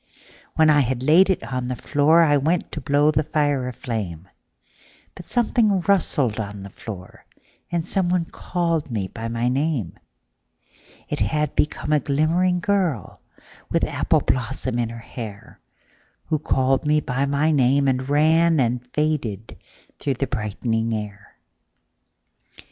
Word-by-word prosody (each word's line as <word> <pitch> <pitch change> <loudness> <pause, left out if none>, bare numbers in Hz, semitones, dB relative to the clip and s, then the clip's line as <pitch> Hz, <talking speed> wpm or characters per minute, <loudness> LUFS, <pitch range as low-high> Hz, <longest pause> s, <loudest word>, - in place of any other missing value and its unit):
When 155 -1 +5
I 145 - +5
had 130 -2 0
laid 170 +7 +5
it 190 - 0
on 125 -1 -3
the 125 - -2
floorI 150 +3 +3
went 165 +4 0
to 150 - -5
blow 145 +3 +3
the 155 - +2
fire 145 -4 0
a - - -3
flame, 100 - -5 0.9
But 180 - -12
something 220 -5 +2
rustled 150 - +1
on 100 -2 -5
the 100 - -9
floor, 95 -4 -10 0.5
And 170 0 -1
someone 180 -2 +1
called 170 -4 -2
me 100 -6 -3
by 115 +3 -6
my 115 +1 -1
name:It 125 - -6
had 150 -2 0
become 150 0 0
a 150 - +4
glimmering 170 +6 +1
girlWith 185 - -3
apple - - +1
blossom 130 -1 -2
in 115 -1 0
her 115 0 -9 1.3
hairWho 155 -1 0
called 130 0 +1
me 150 0 +3
by 135 -1 -1
my 145 +3 +1
name 140 0 +3
and 130 -1 +2
ranAnd 145 -3 +2
faded 135 -9 -2 0.4
through 140 -2 -1
the 135 - -1
brightening 115 -1 -2
air. 105 -1 -8
140 Hz, 130 wpm, -22 LUFS, 120-160 Hz, 1.3 s, When